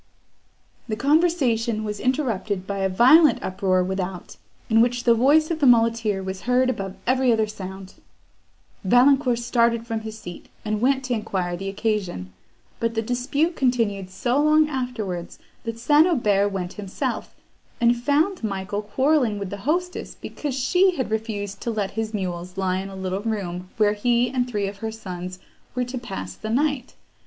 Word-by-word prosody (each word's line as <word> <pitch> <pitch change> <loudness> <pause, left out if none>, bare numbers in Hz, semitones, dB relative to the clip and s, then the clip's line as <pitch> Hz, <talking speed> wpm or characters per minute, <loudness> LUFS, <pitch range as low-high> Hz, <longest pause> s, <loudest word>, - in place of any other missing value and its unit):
The 215 - -2
conversation 265 -7 +2
was 210 -1 -4
interrupted 225 -8 -1
by 200 0 -3
a 190 0 +1
violent 260 - +6
uproar 185 -1 +1
without, 185 -1 -4 0.3
in 225 0 +4
which 240 0 +1
the 235 - +5
voice 290 +7 +4
of 325 - -2
the 285 - +4
muleteer 230 -4 +3
was 190 0 -5
heard 255 +1 +3
above 195 -5 -5
every 255 0 +3
other 220 -1 +2
sound. 190 -2 -8 0.9
Valancourt 250 +4 +4
started 235 -1 +1
from 225 -1 -2
his 220 0 -7
seat, 175 -5 -10 0.2
and 215 0 -1
went 270 +2 +2
to 255 -1 -2
enquire 190 -6 -2
the 195 +2 -4
occasion; 195 - -2 0.5
but 230 0 -1
the 225 - 0
dispute 270 +8 0
continued 225 -8 0
so 240 +9 0
long 305 +1 +4
afterwards, 235 - -4 0.3
that 230 0 -4
St. 295 +7 +5
Aubert 205 - +2
went 185 -2 -4
himself, 195 -2 -4 0.4
and 235 0 +4
found 295 +8 +1
Michael 200 0 -2
quarrelling 250 +1 +1
with 200 -2 -5
the 200 - -4
hostess, 360 +3 -2
because 290 -4 -5
she 360 +8 +3
had 260 -7 -3
refused 205 -3 -3
to - - -3
let 210 -4 -2
his 220 +1 -3
mules 180 -3 -4
lie 185 -1 0
in 195 +1 -5
a 195 - -9
little 190 +1 -3
room 185 -5 -4
where 210 -1 +3
he 240 +3 +1
and 250 -2 -1
three 205 -4 -1
of 200 0 -7
her 220 +2 -4
sons 185 -4 -7 0.4
were 250 - +1
to 250 +1 -5
pass 95 - -6
the 215 - -7
night. 275 +1 0
225 Hz, 170 wpm, -23 LUFS, 195-255 Hz, 0.9 s, violent